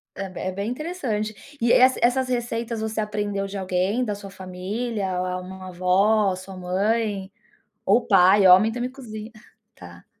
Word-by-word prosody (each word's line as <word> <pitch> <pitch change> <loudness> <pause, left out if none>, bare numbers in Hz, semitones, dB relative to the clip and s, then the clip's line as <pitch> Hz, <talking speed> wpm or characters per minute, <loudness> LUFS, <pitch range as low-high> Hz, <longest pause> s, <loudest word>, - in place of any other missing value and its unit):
é 195 0 -4
b 185 - -9
é 185 - -2
bem 200 +3 -3
interessante. 250 -7 -3 0.3
E 235 - +3
es 255 +1 +6
essas 255 +2 +2
receitas 235 -2 -2
você 220 0 -3
aprendeu 205 -2 -2
de 200 - -6
alguém, 190 +5 0
da 210 -4 -2
sua 200 -1 -10
família, 190 +2 -4 0.2
ou - - -8
uma 185 0 -9
avó, 190 +3 +2
sua 185 +1 -10
mãe, 200 +2 -1 0.5
ou 245 - +4
pai, 195 -1 +6
homem 190 +5 +7
também 245 +2 -3
cozinha. 225 -4 -9 0.4
Tá. 85 -1 -13
205 Hz, 160 wpm, -24 LUFS, 185-230 Hz, 0.5 s, homem